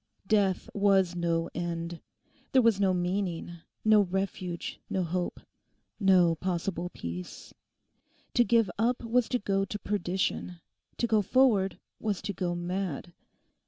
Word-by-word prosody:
Death 195 Hz, -2 st, +2 dB
was 195 Hz, -3 st, +3 dB
no 170 Hz, -1 st, 0 dB
end. 170 Hz, 0 st, -4 dB, 0.5 s
There 260 Hz, -, +6 dB
was 225 Hz, -4 st, +4 dB
no 195 Hz, -2 st, +3 dB
meaning, 180 Hz, -1 st, -2 dB, 0.3 s
no 215 Hz, -1 st, +7 dB
refuge, 185 Hz, -2 st, -3 dB
no 190 Hz, -, 0 dB
hope, 175 Hz, +1 st, -2 dB, 0.6 s
no 185 Hz, -4 st, +5 dB
possible 175 Hz, +1 st, -2 dB
peace. 90 Hz, -, -7 dB, 0.8 s
To 240 Hz, -, +5 dB
give 230 Hz, -5 st, +3 dB
up 240 Hz, +2 st, +1 dB
was 235 Hz, +1 st, +1 dB
to 250 Hz, -, +2 dB
go 195 Hz, -3 st, 0 dB
to 195 Hz, +1 st, -4 dB
perdition: 185 Hz, -3 st, -2 dB, 0.4 s
to -, -, +1 dB
go 220 Hz, -2 st, +3 dB
forward 205 Hz, -3 st, +3 dB, 0.2 s
was 210 Hz, -4 st, -1 dB
to 200 Hz, -, -3 dB
go 175 Hz, -1 st, -2 dB
mad. 175 Hz, -2 st, -3 dB
190 Hz, 130 wpm, -29 LUFS, 175-205 Hz, 0.8 s, no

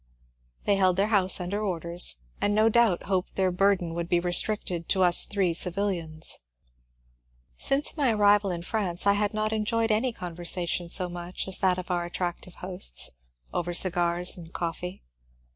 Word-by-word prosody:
They 200 Hz, -, +2 dB
held 185 Hz, -2 st, +3 dB
their 200 Hz, +2 st, +1 dB
house 195 Hz, -4 st, +3 dB
under 190 Hz, +4 st, -3 dB
orders, 175 Hz, -, 0 dB, 0.3 s
and 205 Hz, 0 st, +1 dB
no 215 Hz, +1 st, +4 dB
doubt 225 Hz, -6 st, +2 dB
hoped 190 Hz, -1 st, -2 dB
their 190 Hz, -1 st, +1 dB
burden 180 Hz, -2 st, +1 dB
would 170 Hz, 0 st, -4 dB
be 175 Hz, -, +3 dB
restricted 175 Hz, -1 st, -1 dB
to 190 Hz, -2 st, +3 dB
us 175 Hz, -1 st, +7 dB
three 195 Hz, -4 st, 0 dB
civUians. 170 Hz, -3 st, -1 dB, 1.2 s
Siuce 275 Hz, +2 st, -1 dB
my 280 Hz, -6 st, +2 dB
arrival 205 Hz, -1 st, +3 dB
in 170 Hz, -2 st, -4 dB
France 185 Hz, -3 st, -2 dB
I 200 Hz, -, +5 dB
had 205 Hz, 0 st, 0 dB
not 215 Hz, 0 st, -1 dB
enjoyed 225 Hz, +1 st, 0 dB
any 230 Hz, +4 st, +1 dB
conversation 175 Hz, -2 st, -2 dB
so 180 Hz, +1 st, +2 dB
much 175 Hz, +1 st, -6 dB
as 190 Hz, -, -1 dB
that 185 Hz, -1 st, +2 dB
of 185 Hz, 0 st, -5 dB
our 175 Hz, -1 st, 0 dB
attractive 175 Hz, 0 st, -4 dB
hosts, 180 Hz, -, -1 dB, 0.4 s
over 175 Hz, 0 st, -2 dB
cigars 175 Hz, -1 st, +2 dB
and 165 Hz, -1 st, -12 dB
coffee. 175 Hz, +2 st, -5 dB
185 Hz, 160 wpm, -27 LUFS, 175-205 Hz, 1.2 s, us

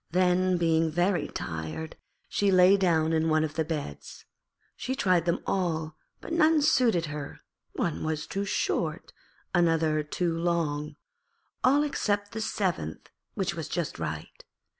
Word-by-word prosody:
Then, 180 Hz, +1 st, +2 dB
being 165 Hz, -1 st, +2 dB
very 175 Hz, +4 st, +1 dB
tired, 80 Hz, -, -5 dB, 0.3 s
she 205 Hz, -, +1 dB
lay 185 Hz, +1 st, +7 dB
down 165 Hz, -4 st, +2 dB
in 160 Hz, 0 st, +2 dB
one 155 Hz, 0 st, +3 dB
of 155 Hz, -1 st, -3 dB
the 160 Hz, -, 0 dB
beds. 150 Hz, -, -6 dB, 0.5 s
She 260 Hz, -, -3 dB
tried 180 Hz, -, +2 dB
them 170 Hz, -, 0 dB
all 160 Hz, -4 st, -1 dB, 0.3 s
but -, -, -6 dB
none 320 Hz, -2 st, +4 dB
suited 240 Hz, -, +3 dB
her; 145 Hz, -2 st, -7 dB, 0.3 s
one 165 Hz, -, -2 dB
was 155 Hz, -1 st, -2 dB
too 195 Hz, -, -3 dB
short, 170 Hz, -4 st, -2 dB, 0.4 s
another 165 Hz, -3 st, +2 dB
too 165 Hz, +3 st, -2 dB
long, 165 Hz, -3 st, -1 dB, 0.7 s
all 280 Hz, +3 st, +5 dB
except 205 Hz, -8 st, -1 dB
the 220 Hz, -, -4 dB
seventh, 180 Hz, -, -2 dB, 0.2 s
which -, -, -1 dB
was -, -, -5 dB
just -, -, -3 dB
right. -, -, -6 dB
170 Hz, 140 wpm, -28 LUFS, 155-195 Hz, 0.7 s, lay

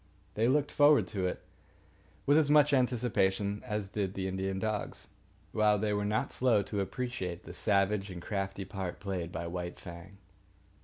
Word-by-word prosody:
They 110 Hz, +2 st, +2 dB
looked 145 Hz, +2 st, +2 dB
forward 145 Hz, 0 st, +5 dB
to 95 Hz, -3 st, -1 dB
it -, -, -4 dB, 0.8 s
with 145 Hz, -, +5 dB
as 155 Hz, -2 st, +4 dB
much 150 Hz, -1 st, +5 dB
anticipation 105 Hz, -6 st, +1 dB
as 105 Hz, -5 st, -3 dB
did 100 Hz, -2 st, -2 dB
the 95 Hz, -1 st, -2 dB
Indian 95 Hz, 0 st, -2 dB
dogs, 105 Hz, +1 st, -3 dB, 0.4 s
while 105 Hz, -1 st, +3 dB
they 105 Hz, +1 st, 0 dB
were 105 Hz, 0 st, 0 dB
not 105 Hz, +1 st, -1 dB
slow 115 Hz, -5 st, +3 dB
to 100 Hz, 0 st, -2 dB
appreciate 95 Hz, -5 st, -4 dB
the -, -, -9 dB
savage 100 Hz, -1 st, +1 dB
and 90 Hz, -2 st, -6 dB
crafty 95 Hz, 0 st, -3 dB
part 95 Hz, -3 st, -5 dB
played 90 Hz, -4 st, -3 dB
by 85 Hz, -1 st, -4 dB
White 85 Hz, 0 st, -5 dB
Fang. 85 Hz, +2 st, -10 dB
100 Hz, 165 wpm, -31 LUFS, 95-115 Hz, 0.8 s, forward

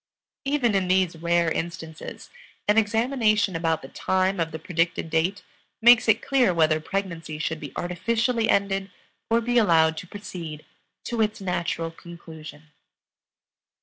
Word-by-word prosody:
Even 275 Hz, -5 st, +1 dB
in 190 Hz, -2 st, +1 dB
these 185 Hz, -2 st, +2 dB
rare 170 Hz, 0 st, +1 dB
instances 165 Hz, -1 st, -6 dB, 0.4 s
an 210 Hz, -, +4 dB
examination 220 Hz, -3 st, +1 dB
about 165 Hz, -1 st, 0 dB
the -, -, -7 dB
time 190 Hz, +5 st, 0 dB
of 165 Hz, -1 st, 0 dB
the 160 Hz, -, -5 dB
predicted 165 Hz, -1 st, -1 dB
date 175 Hz, +4 st, 0 dB, 0.4 s
makes 240 Hz, +1 st, +6 dB
it 220 Hz, -1 st, +3 dB
clear 250 Hz, -10 st, +3 dB
whether 155 Hz, -1 st, +3 dB
pregnancy 165 Hz, -3 st, -4 dB
should 160 Hz, 0 st, -2 dB
be 145 Hz, -3 st, -8 dB
artificially 225 Hz, +6 st, 0 dB
ended 195 Hz, -1 st, +1 dB, 0.4 s
or 230 Hz, +1 st, +3 dB
be 240 Hz, +1 st, +2 dB
allowed 160 Hz, -6 st, +4 dB
to 180 Hz, -, -7 dB
proceed 170 Hz, -6 st, -8 dB, 0.4 s
to 235 Hz, -2 st, -2 dB
its 215 Hz, 0 st, 0 dB
natural 170 Hz, -3 st, -2 dB
conclusion. 160 Hz, -3 st, -12 dB
180 Hz, 140 wpm, -25 LUFS, 165-215 Hz, 0.4 s, makes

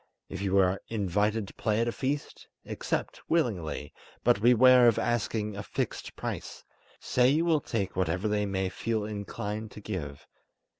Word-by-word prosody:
If 95 Hz, -, -6 dB
you 100 Hz, -1 st, +1 dB
are 95 Hz, 0 st, +3 dB
invited 105 Hz, 0 st, 0 dB
to -, -, -12 dB
play 110 Hz, -1 st, 0 dB
at 115 Hz, -, +1 dB
a -, -, +1 dB
feast, 140 Hz, +4 st, -4 dB, 0.2 s
accept -, -, -3 dB
willingly, 110 Hz, -, -1 dB, 0.3 s
but 120 Hz, -4 st, +3 dB
beware 125 Hz, +1 st, +7 dB
of 115 Hz, -2 st, +4 dB
asking 110 Hz, -2 st, -1 dB
a 100 Hz, -, -4 dB
fixed -, -, -4 dB
price; -, -, -5 dB, 0.4 s
say 125 Hz, 0 st, +3 dB
you 155 Hz, +5 st, +2 dB
will 160 Hz, -3 st, +3 dB
take 100 Hz, -6 st, -3 dB
whatever 90 Hz, +2 st, 0 dB
they 105 Hz, -1 st, 0 dB
may 95 Hz, -1 st, -1 dB
feel 110 Hz, +2 st, -2 dB
inclined 105 Hz, +1 st, -5 dB
to -, -, -9 dB
give. 85 Hz, -9 st, -6 dB
105 Hz, 160 wpm, -29 LUFS, 100-120 Hz, 0.4 s, beware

